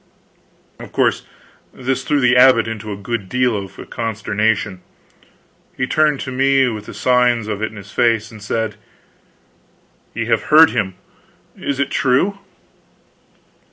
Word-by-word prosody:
Of - - -10
course - - 0 0.4
this 130 +1 -3
threw 150 - +1
the 125 -2 +3
abbot 125 -2 +6
into 110 -1 -6
a 100 - -5
good 100 -1 -4
deal 125 -2 +1
of 100 -2 -6
a - - -9
consternation. 110 -3 -2 1.0
He 130 - 0
turned 150 0 +1
to 130 - -5
me 135 0 +3
with 110 -2 -7
the - - -8
signs 125 -3 +2
of 105 -1 -4
it 110 - -1
in - - -15
his 100 -1 -11
face, 115 -2 +1
and 110 -2 -12
said: 105 0 -3 1.4
"Ye - - -2
have - - 0
heard 160 +1 +7
him. 95 -3 -2 0.6
Is 140 -1 -4
it 140 - -1
true?" 145 +10 +1
115 Hz, 150 wpm, -18 LUFS, 105-130 Hz, 1.4 s, heard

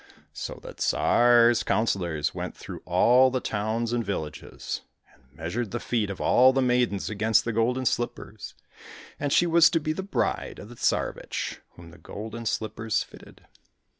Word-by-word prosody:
So - - -6
the - - -10
Tsar's 120 -1 +4
councillors 85 -8 0
went - - -6
through - - -9
all 130 +2 +5
the 130 0 -1
towns 115 +2 -2
and 120 -1 0
villages, 85 -7 -5 0.3
and - - -27 0.2
measured 100 +8 -3
the 120 - -4
feet 110 -4 -1
of 100 - -6
all 130 +1 +5
the 135 - +1
maidens 125 -5 +1
against 110 +1 +2
the 115 - -2
golden 125 +4 0
slippers, 120 0 -3 0.6
and 145 -1 -2
she 175 - +4
was 170 0 +6
to 165 - +1
be 155 0 -2
the 175 - -4
bride 195 - -2
of 105 - -10
the 120 - -11
Tsarevich - - -2
whom 85 -1 -13
the 85 - -16
golden 110 +2 -7
slippers 110 0 -1
fitted. - - -16
115 Hz, 165 wpm, -26 LUFS, 105-125 Hz, 0.6 s, was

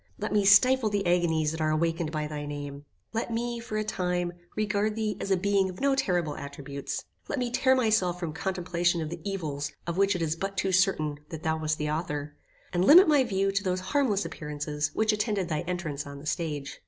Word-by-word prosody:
Let 215 +1 -3
me 205 -1 +3
stifle 225 +4 +6
the 205 -1 -1
agonies 165 -3 +2
that 160 0 -4
are 155 - +2
awakened 165 0 0
by 155 -1 -2
thy 150 -1 -5
name. 145 -1 -6 0.3
Let 230 +1 -2
me, 235 +1 -2
for 225 -2 -4
a 215 - 0
time, 180 -4 -1 0.2
regard 210 0 0
thee 215 -2 -1
as - - -3
a 190 - +3
being 195 0 +2
of 185 - -9
no 275 0 +3
terrible 175 - 0
attributes. 140 0 -6 0.2
Let - - -2
me 245 -2 -1
tear 260 +1 +3
myself 215 -8 +2
from 170 -4 -3
contemplation 175 -2 0
of 155 - -5
the 170 -1 -6
evils 150 -7 -3
of 170 0 -3
which 195 0 +3
it 175 - -1
is 160 0 0
but 195 +3 -4
too 190 0 +1
certain 165 -6 +2
that 160 -1 -7
thou 160 0 +1
wast 155 0 -1
the 150 0 -2
author, 150 -2 -3 0.4
and 175 0 +2
limit 340 - +9
my 295 -3 +5
view 195 -4 0
to 200 0 0
those 185 -1 0
harmless 230 -9 +2
appearances 150 -1 -3
which 220 0 +2
attended 210 -4 -1
thy 155 -2 -1
entrance 160 -6 -3
on 140 0 -8
the 140 - -11
stage. 150 -3 -3
180 Hz, 215 wpm, -28 LUFS, 155-205 Hz, 0.4 s, limit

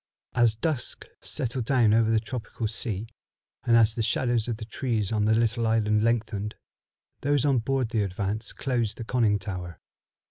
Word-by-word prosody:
As 120 -3 +4
dusk 140 +2 -2 0.2
settled 125 -1 -3
down 120 -5 +4
over 110 0 +4
the 115 -1 +3
tropical 110 0 -4
sea, 110 -1 -2 0.6
and 120 -2 +4
as 110 -1 +5
the 115 - -2
shadows 120 0 +1
of 115 -3 -2
the 110 - -7
trees 110 -3 -2
on 105 -2 +1
the 110 +1 +4
little 115 0 +1
island 105 -1 +2
lengthened, 110 -2 -1 0.7
those 145 -1 +2
on 135 -4 +3
board 130 0 0
the 115 -3 +1
Advance 100 +3 -2
closed 120 -5 -1
the 120 - -5
Conning 115 -3 +2
tower. 90 -3 -6
115 Hz, 170 wpm, -27 LUFS, 105-120 Hz, 0.7 s, as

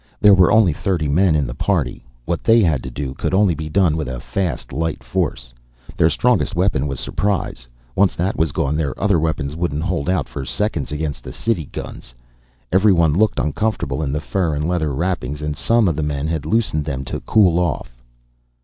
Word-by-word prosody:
There 105 -1 +7
were 95 -2 +5
only 110 -7 +5
thirty 85 -1 -1
men 80 +3 +3
in 75 -2 +1
the - - -5
party. 70 -4 -1 0.2
What 85 0 -2
they 115 0 +5
had 75 -7 +1
to - - -6
do 65 +1 -5
could 80 - -2
only 100 -3 +4
be 80 0 -5
done 85 -2 +2
with 80 -4 -3
a 65 -1 -4
fast, 80 -7 -3
light 80 +2 -2
force. - - -3 0.4
Their 80 - +4
strongest 70 -6 +1
weapon 85 -6 +1
was 70 -3 -3
surprise. 95 -4 -2 0.3
Once 100 -1 +3
that 90 +3 -1
was 80 -2 +1
gone 70 -1 -1
their 75 -4 -2
other 100 -4 +2
weapons 80 -2 -2
wouldn't 80 -3 -2
hold 90 -4 -1
out 90 -7 0
for 70 - -6
seconds 70 - -2
against 75 -1 -4
the - - -7
city 105 -9 -1
guns. - - -9 0.6
Everyone 90 -5 +4
looked 105 +5 +2
uncomfortable 105 +1 -1
in 70 -3 -1
the 75 - -1
fur 85 -2 -1
and 75 +2 -1
leather 85 -4 0
wrappings, 75 -2 -2
and 75 0 -3
some 115 +5 +2
of 85 - +1
the 80 - -2
men 75 -1 -2
had 80 -2 -3
loosened 100 -7 +1
them 65 -3 -4
to - - -4
cool 90 -6 +3
off. 70 -8 -3
80 Hz, 205 wpm, -20 LUFS, 70-95 Hz, 0.6 s, There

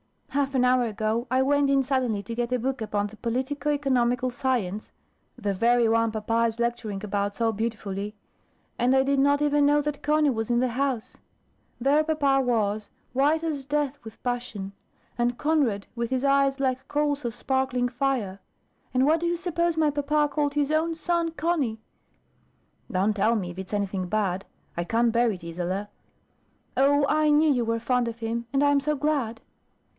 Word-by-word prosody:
Half 275 -1 -1
an 250 -1 +3
hour 250 -1 +3
ago, 220 +2 -1
I 260 +1 +3
went 285 +1 +2
in 275 -1 +3
suddenly 255 -6 0
to 230 - -6
get 240 +1 -2
a - - +3
book 255 +1 -2
upon 205 -1 -1
the 215 +1 -13
politico 265 +6 -2
economical 255 -3 +1
science, 235 -6 -2 0.5
the 205 -5 -1
very 235 +4 +3
one 230 0 +2
papa 225 +2 0
is 225 0 -4
lecturing 235 -4 -2
about 200 0 -2
so 230 -1 +1
beautifully; 210 -2 -4 0.6
and 250 +2 +3
I 265 - +4
did 275 0 +1
not 285 +1 +3
even 290 0 +3
know 295 0 +4
that 290 -1 -4
Conny 300 -1 +3
was 225 -2 -3
in 240 0 +2
the 255 0 +1
house. 255 -1 -2 0.6
There 280 +5 +3
papa 285 -4 +2
was, 215 -4 0 0.2
white 295 +5 +2
as 295 -5 -3
death 290 -1 -1
with 220 -1 -12
passion; 240 -6 -3 0.5
and 240 0 +1
Conrad 280 -10 +1
with 235 -1 -2
his 260 0 -1
eyes 275 0 +3
like 265 -1 -1
coals 290 -1 0
of 235 -1 -3
sparkling 260 -1 0
fire; 245 -7 -1 0.6
and 255 +1 +4
what 315 +3 +3
do 340 - -1
you 345 0 0
suppose 340 -1 -1
my 310 -2 +3
papa 295 +1 +1
called 290 -1 0
his 295 0 +1
own 325 +1 +1
son 335 0 0
Conny?" 315 -9 -1 1.1
"Don't 195 +3 +1
tell 220 +3 +2
me, 185 -5 -2
if 175 - -9
it's 190 +1 -7
anything 195 -2 -1
bad. 195 -2 -1 0.3
I 170 - -1
can't 230 +6 +2
bear 235 +1 +3
it, 185 -4 -7
Isola." 180 +4 -3 0.9
"Oh, 280 +1 +4
I 305 +1 +3
knew 300 +1 +4
you 245 -4 +1
were 230 0 0
fond 245 +1 +1
of 230 0 -5
him, 230 +1 -3
and 275 +2 +2
I 285 - +4
am 285 - +4
so 300 +2 -1
glad!" 270 -6 -1
250 Hz, 185 wpm, -26 LUFS, 225-285 Hz, 1.1 s, I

